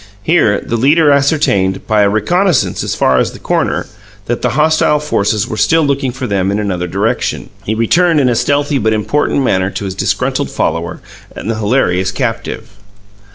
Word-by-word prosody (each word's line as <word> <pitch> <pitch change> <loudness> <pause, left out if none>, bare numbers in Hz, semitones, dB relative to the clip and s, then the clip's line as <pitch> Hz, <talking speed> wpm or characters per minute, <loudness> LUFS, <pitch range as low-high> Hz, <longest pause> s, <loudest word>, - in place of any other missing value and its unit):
Here 110 -11 +2
the 115 - -2
leader 145 +5 +4
ascertained, 140 -10 +1
by 110 -1 +2
a 100 - +3
reconnaissance 170 - +1
as - - -2
far 65 -1 +2
as - - -1
the - - -10
corner, - - -1 0.4
that 120 +2 -2
the - - -1
hostile 155 -1 +3
forces 105 -8 0
were 110 - -5
still 160 +9 +3
looking 140 -2 0
for 130 +1 -6
them 95 -4 0
in 100 - 0
another 95 -4 -2
direction. 100 +5 -2
He 110 - -1
returned 160 +9 +2
in 135 - +2
a 125 - +2
stealthy 145 +3 0
but 110 -1 +1
important 140 +6 0
manner 95 -6 +1
to 100 - -5
his 95 - -4
disgruntled - - -1
follower 85 0 -2 0.3
and 115 - -4
the 110 - -3
hilarious 100 -5 +1
captive. 115 -1 -4
115 Hz, 180 wpm, -14 LUFS, 100-145 Hz, 0.4 s, leader